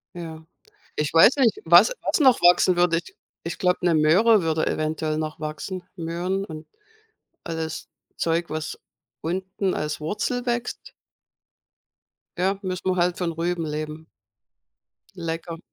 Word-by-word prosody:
Ja, 160 Hz, -2 st, -8 dB, 0.5 s
ich 150 Hz, -1 st, -2 dB
weiß 165 Hz, -, +7 dB
nicht, 265 Hz, -, +3 dB
was -, -, +7 dB
was -, -, 0 dB
noch 260 Hz, -4 st, +5 dB
wachsen 175 Hz, +1 st, +5 dB
würde. 175 Hz, -1 st, +3 dB
Ich 170 Hz, -, -7 dB, 0.3 s
ich 170 Hz, -, -5 dB
glaube, 180 Hz, -1 st, +2 dB
'ne 170 Hz, -, +4 dB
Möhre 185 Hz, +8 st, +5 dB
würde 160 Hz, -1 st, 0 dB
eventuell 155 Hz, 0 st, -1 dB
noch 155 Hz, -1 st, -4 dB
wachsen. 155 Hz, +4 st, -5 dB
Möhren 175 Hz, +3 st, -2 dB
und 155 Hz, -3 st, -9 dB, 0.8 s
alles 160 Hz, -2 st, -5 dB, 0.3 s
Zeug, 170 Hz, +1 st, 0 dB
was 155 Hz, 0 st, -5 dB, 0.4 s
unten 190 Hz, +3 st, -2 dB
als 150 Hz, 0 st, -3 dB
Wurzel 245 Hz, +9 st, -2 dB
wächst. 240 Hz, 0 st, -3 dB, 1.5 s
Ja, 190 Hz, +2 st, +1 dB
müssen 185 Hz, 0 st, -4 dB
wir 185 Hz, -, +1 dB
halt 175 Hz, 0 st, +1 dB
von 170 Hz, -2 st, -1 dB
Rüben 170 Hz, +1 st, -2 dB
leben. 155 Hz, +1 st, -5 dB, 1.1 s
Lecker. 165 Hz, -1 st, -5 dB
170 Hz, 135 wpm, -24 LUFS, 160-185 Hz, 1.5 s, weiß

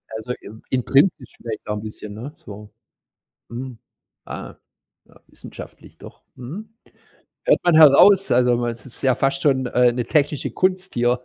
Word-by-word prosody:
Also, 110 Hz, +3 st, -5 dB
in 110 Hz, +2 st, -12 dB
intrinsisch 135 Hz, +2 st, +2 dB
vielleicht 115 Hz, -2 st, -7 dB
auch 105 Hz, -, -2 dB
'n 105 Hz, -, -5 dB
bisschen, 105 Hz, -1 st, -9 dB
ne, 120 Hz, +8 st, -8 dB
so. 105 Hz, -2 st, -11 dB, 0.8 s
Mhm. 125 Hz, +1 st, -7 dB, 0.5 s
Ah, -, -, -8 dB, 0.5 s
ja, -, -, -22 dB
wissenschaftlich -, -, -13 dB
doch. -, -, -14 dB
Mhm. 165 Hz, -, -9 dB, 0.8 s
Hört -, -, +3 dB
man 175 Hz, -, +3 dB
heraus, 180 Hz, +6 st, +7 dB
also, 125 Hz, 0 st, +3 dB
man 120 Hz, 0 st, -1 dB
es 115 Hz, 0 st, -11 dB
ist 125 Hz, -, -9 dB
ja 130 Hz, -2 st, +3 dB
fast 135 Hz, +2 st, -1 dB
schon, 130 Hz, -3 st, +2 dB
äh, 125 Hz, 0 st, +3 dB
'ne 120 Hz, 0 st, -3 dB
technische 145 Hz, +2 st, 0 dB
Kunst 185 Hz, 0 st, -1 dB
hier. 120 Hz, +1 st, +1 dB
125 Hz, 160 wpm, -21 LUFS, 120-145 Hz, 0.8 s, heraus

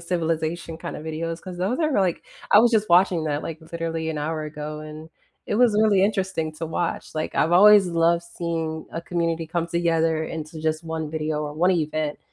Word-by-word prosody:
civilization, 165 Hz, -1 st, -2 dB
kinda -, -, -6 dB
videos, 165 Hz, +1 st, -4 dB
'cause 180 Hz, -2 st, -8 dB
those 200 Hz, -, -1 dB
are, 310 Hz, -2 st, +1 dB
like 190 Hz, -7 st, +1 dB, 0.3 s
I 205 Hz, -, +9 dB
was 240 Hz, +1 st, +4 dB
just 215 Hz, -2 st, +2 dB
watching 175 Hz, -2 st, +4 dB
that, 145 Hz, -1 st, -1 dB
like, 160 Hz, -1 st, -6 dB
literally 165 Hz, -1 st, -3 dB
an 160 Hz, -, -3 dB
hour 155 Hz, +1 st, -2 dB
ago, 150 Hz, 0 st, -6 dB
and 155 Hz, +1 st, -10 dB, 0.4 s
it 205 Hz, -, -1 dB
was 240 Hz, -3 st, +4 dB
really 205 Hz, -3 st, +4 dB
interesting 190 Hz, -6 st, 0 dB
to 160 Hz, +2 st, -6 dB
watch, 165 Hz, +1 st, -3 dB
like, 155 Hz, 0 st, -3 dB
I've 165 Hz, +3 st, +2 dB
always 205 Hz, +1 st, +7 dB
loved 170 Hz, 0 st, +2 dB
seeing 165 Hz, -2 st, -4 dB
a 165 Hz, -, -3 dB
community 165 Hz, -2 st, -1 dB
come 170 Hz, +1 st, -2 dB
together 165 Hz, -2 st, +1 dB
into 155 Hz, 0 st, -6 dB
just 155 Hz, +1 st, -1 dB
one 160 Hz, -1 st, -4 dB
video 155 Hz, -1 st, -2 dB
or 150 Hz, -1 st, -4 dB
one 175 Hz, +5 st, +2 dB
event 155 Hz, -3 st, -1 dB
165 Hz, 195 wpm, -24 LUFS, 155-175 Hz, 0.4 s, I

